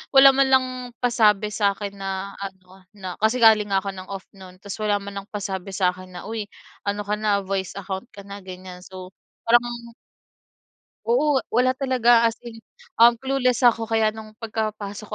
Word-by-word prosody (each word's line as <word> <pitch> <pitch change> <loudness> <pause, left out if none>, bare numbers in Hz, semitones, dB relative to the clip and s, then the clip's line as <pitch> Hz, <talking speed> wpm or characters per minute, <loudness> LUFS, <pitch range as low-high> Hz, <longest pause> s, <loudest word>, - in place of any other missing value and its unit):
wala 270 0 +10
man 275 0 +4
lang 260 -1 +5 0.4
pasabi 215 -4 +3
sa'kin 200 -1 -1
na 195 0 -4
ano 190 -1 -10
na, 185 -3 -6
kasi 220 +3 +3
galing 220 -2 +6
nga 195 0 +3
ako 200 - -3
ng 185 0 -9
off 195 -1 -7
no'n, 185 -1 -13
ta's 200 0 -7
wala 210 -1 +2
man 200 0 -6
lang 200 - -20
pasabi 195 -1 -4
sa'kin 185 -1 -1
na, 180 - -8
"Uy, 220 -2 -3 0.4
ano 205 +1 -1
ka 210 +1 0
na, 205 -2 +1
voice 190 -1 -2
account 195 +2 -5
ka 200 - -10
na," 200 0 -8
ganyan, 180 -1 -9
so 185 -1 -10 0.4
parang 235 0 +1 1.1
Oo, 300 - +3
wala 250 +2 +3
talaga, 240 -3 +3
as 230 - -6
in, 225 -1 -9 0.4
um, 235 0 +8
clueless 255 -1 0
ako, 230 -2 +4
kaya 220 -1 +2
no'ng 215 -1 -11
pagkapasok 215 -2 -4
210 Hz, 175 wpm, -23 LUFS, 195-235 Hz, 1.1 s, wala